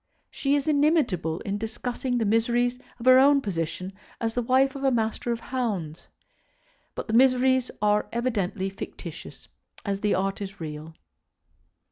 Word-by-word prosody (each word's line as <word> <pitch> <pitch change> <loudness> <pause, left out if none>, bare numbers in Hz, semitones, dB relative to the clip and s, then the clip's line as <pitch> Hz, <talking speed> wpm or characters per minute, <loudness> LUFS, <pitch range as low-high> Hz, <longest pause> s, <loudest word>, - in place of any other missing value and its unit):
She 280 0 0
is 285 +1 -1
inimitable 285 - +2
in 205 -2 -3
discussing 245 +3 -3
the 225 - +1
miseries 240 +3 +1 0.2
of 235 - -8
her 255 0 +8
own 280 +1 +6
position 185 - -4 0.3
as 225 -1 -1
the 245 - 0
wife 260 +3 +2
of 275 - -6
a 270 - +4
Master 230 0 -1
of 230 - -2
Hounds; 200 -12 -3 0.9
but - - -4
the 220 - -3
miseries 255 +1 +4
are 210 0 +3
as - - -27
evidently 205 -5 -1
fictitious 195 - -9 0.4
as 200 -1 -1
the 210 0 +1
art 195 +2 -1
is 195 0 -7
real. 155 0 -7
230 Hz, 155 wpm, -26 LUFS, 195-255 Hz, 0.9 s, her